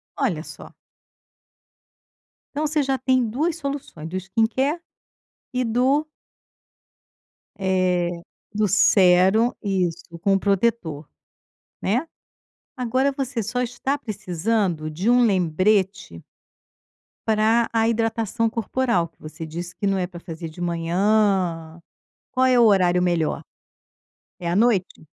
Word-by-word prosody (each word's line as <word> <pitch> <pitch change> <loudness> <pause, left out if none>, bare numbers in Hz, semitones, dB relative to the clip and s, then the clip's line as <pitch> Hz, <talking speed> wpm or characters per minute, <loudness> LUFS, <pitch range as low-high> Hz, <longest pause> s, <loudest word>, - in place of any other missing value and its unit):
Olha, 180 - -1
só. - - -11 1.8
Então, 300 +2 -1
você 300 -1 +1
já 270 0 0
tem 255 -1 +2
2 295 +10 -1
soluções, 280 - -6
do 185 - -3
skincare 225 - 0 0.7
e 255 0 0
do 260 +6 +2 1.5
eh, 185 -2 +1 0.4
do 210 0 +1
sérum. 190 +3 +4
Isso, 180 -4 -2
com 195 - +2
o - - +1
protetor, 195 -7 0 0.7
né? 245 - 0 0.7
Agora 255 +2 +1
você 265 -3 -3
só 225 +4 -2
está 250 +3 -2
precisando 195 - -2
de 180 +9 0
um 245 0 +5
lembrete 190 - +1 1.1
pra 220 +2 +3
a 225 -1 +2
hidratação 225 -1 0
corporal 230 -4 0
que 165 - -36
você 155 +1 -8
disse 170 +3 -7
que - - -4
não 195 -1 +1
é 180 -1 -1
pra 175 -1 -10
fazer 165 -1 -7
de 160 +3 -14
manhã. 175 -1 0 0.5
Qual 260 0 +2
é 250 -1 +4
o - - +7
horário 180 -4 +4
melhor? 175 -3 0 1.0
É 170 - -4
à 170 - 0
noite? 205 -7 +1
205 Hz, 120 wpm, -23 LUFS, 175-240 Hz, 1.8 s, o